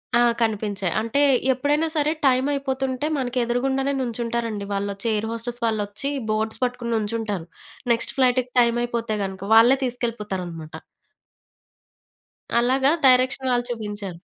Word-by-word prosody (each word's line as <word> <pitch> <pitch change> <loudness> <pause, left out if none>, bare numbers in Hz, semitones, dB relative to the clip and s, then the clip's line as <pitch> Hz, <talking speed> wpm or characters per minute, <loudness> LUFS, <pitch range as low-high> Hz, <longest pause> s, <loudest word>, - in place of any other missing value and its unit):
ఆ! - - +5 0.2
కనిపించాయి. 205 -4 -1
అంటే 230 +6 0 0.3
ఎప్పుడైనా 295 +5 +1
సరే, 300 0 +2
టైమ్ 260 +1 +3
అయిపోతుంటే, 270 -1 -2
మనకి 255 -1 -3
ఎదురుగుండానే 265 +3 0
నుంచుంటారండి. 230 -3 -3
వాళ్లొచ్చి 200 +2 -3
ఎయిర్ 215 +1 -1
హోస్టెస్ 235 +1 -4
వాళ్లొచ్చి, 215 +5 -2 0.2
బోర్డ్స్ 220 +3 -2
పట్టుకొని 245 -1 -2
నుంచుంటారు. 210 -5 -3 0.5
నెక్స్ట్ 230 - -3
ఫ్లైట్‌కి 255 -1 +2
టైమ్ 235 0 +3
అయిపోతే 230 -2 -2
గనుక, 190 0 -7
వాళ్ళే 240 +4 +7
తీసుకెళ్ళిపోతారన్నమాట. 195 -10 -4 1.8
అలాగా 265 +3 +3
డైరెక్షన్ 255 0 +4
వాళ్ళు 245 0 +1
చూబించారు. 205 -5 -5
235 Hz, 115 wpm, -23 LUFS, 215-255 Hz, 1.8 s, వాళ్ళే